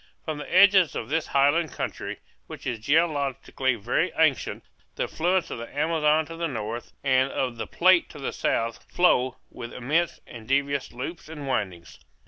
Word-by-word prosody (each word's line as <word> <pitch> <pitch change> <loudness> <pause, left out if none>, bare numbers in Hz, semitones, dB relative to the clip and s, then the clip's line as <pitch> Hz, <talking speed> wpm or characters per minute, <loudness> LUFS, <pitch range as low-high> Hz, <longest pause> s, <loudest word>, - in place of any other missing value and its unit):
From 155 -2 -3
the - - -8
edges 185 -4 +6
of 110 - -4
this 160 +2 0
highland 145 +2 +2
country, - - -5 0.3
which - - -10
is 120 -3 -2
geologically 140 -2 +1
very 120 - 0
ancient, 155 -4 +1 0.3
the - - -1
affluents 180 +2 0
of - - -5
the 115 +4 -9
Amazon 155 0 +2
to 165 - -9
the 165 0 -2
north, 115 -3 -5
and 130 -1 +3
of 125 -3 -2
the 110 - -4
Plate 185 0 +4
to - - -11
the 140 - -4
south, 115 0 -1
flow, 130 -8 +3
with 120 - -8
immense 155 +7 0
and 115 -2 -11
devious 140 +1 0
loops 145 +7 -7
and 150 -3 -7
windings. 95 -9 -3
140 Hz, 170 wpm, -26 LUFS, 125-165 Hz, 0.3 s, edges